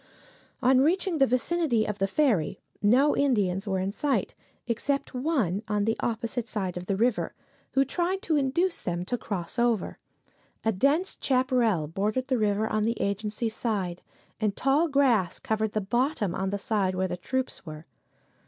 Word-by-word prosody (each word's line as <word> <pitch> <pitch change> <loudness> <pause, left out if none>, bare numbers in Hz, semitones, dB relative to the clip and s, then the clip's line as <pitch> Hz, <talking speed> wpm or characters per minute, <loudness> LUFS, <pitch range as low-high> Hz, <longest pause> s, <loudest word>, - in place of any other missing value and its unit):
On 255 +1 +5
reaching 345 +2 +1
the 270 - +5
vicinity 255 -1 +1
of 210 -1 -4
the 195 - +2
ferry 200 - +1 0.2
no 255 +8 +4
Indians 205 -8 +1
were 190 -1 0
in 190 +1 -1
sight, 280 +6 0 0.3
except 270 +4 -1
one 250 - 0
on 210 -1 0
the 225 +1 +1
opposite 235 +1 -2
side 195 -5 -3
of 180 0 -6
the 195 - +1
river, 230 +3 0 0.4
who 270 0 +4
tried 360 +7 -1
to 320 - +1
induce 300 +6 +1
them 175 0 -3
to 245 - -1
cross 200 -2 -4
over. 235 -5 +1 0.7
A 225 - +4
dense 280 - +1
chaparral 250 - +2
bordered 210 - -2
the 255 -3 +2
river 210 0 +1
on 215 - 0
the 230 +2 0
agency 210 +3 -1
side, 205 -6 -2 0.4
and 210 -2 0
tall 280 +5 +2
grass 255 - +2
covered 220 -1 -1
the 215 - 0
bottom 240 - 0
on 190 +1 -1
the 200 - -1
side 195 -2 0
where 185 +1 0
the 180 - -3
troops 260 +8 -3
were. 155 -2 -9
225 Hz, 170 wpm, -27 LUFS, 195-265 Hz, 0.7 s, On